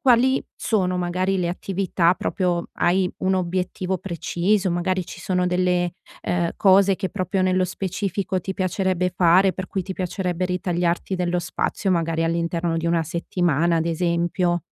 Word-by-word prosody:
quali 260 0 +4
sono 185 -5 0
magari 185 +2 0
le 175 -2 0
attività 180 -1 +1
proprio 180 -3 -1
hai 180 +1 +2
un 190 0 +1
obiettivo 185 +1 -1
preciso, 185 +3 0
magari 180 +1 0
ci - - -9
sono 180 -1 0
delle, 180 -1 +1 0.3
ehm, 175 -1 0
cose 195 0 +5
che 190 -2 -3
proprio 190 0 -1
nello 185 0 +2
specifico 190 0 -2
ti 190 +3 -5
piacerebbe 185 -1 0
fare, 180 +2 +5
per 185 - -5
cui 190 - -3
ti 190 - -5
piacerebbe 180 -1 -2
ritagliarti 180 0 -1
dello 180 -1 0
spazio, 185 +2 -2
magari 165 -1 +1
all'interno 170 0 -1
di 165 - -2
una 170 -1 +2
settimana, 170 -1 0
ad 165 - +1
esempio? 175 +1 0
180 Hz, 150 wpm, -23 LUFS, 175-190 Hz, 0.3 s, cose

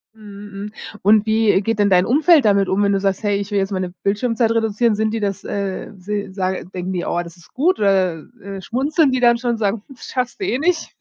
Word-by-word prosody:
Mhm, 205 -1 -11
hm 205 +2 -7 0.3
und 210 +2 +5
wie 220 -2 +3
geht 225 +2 -1
denn 205 -1 +3
dein 180 0 +5
Umfeld 300 +2 +4
damit 200 -2 +3
um, 195 +2 +1
wenn 200 - +2
du 195 - +1
sagst: 195 -1 -1
„Hey, 205 -1 +1
ich 200 +1 -5
will 205 - +1
jetzt 195 +1 -2
meine 185 -2 -2
Bildschirmzeit 225 +3 +1
reduzieren? 225 0 +1
Sind 220 +1 0
die 225 - -1
das, 200 -2 -3
äh, 200 -1 -4
si 200 +1 -4
sage 190 -1 -2
denken 185 +1 -5
die: 175 - -2
„Oh, 175 - -1
das 175 +1 -11
ist 165 - -20
gut“, 345 +8 +1
oder, 185 -5 +1 0.2
äh, 195 -1 -7
schmunzeln 280 - +1
die 255 - 0
dann 235 -1 +4
schon, 240 -1 -1
sagen: 210 -1 -1
„Schaffst 250 0 -4
du - - 0
eh 255 - 0
nicht“? 325 +3 -1
205 Hz, 235 wpm, -20 LUFS, 195-230 Hz, 0.3 s, und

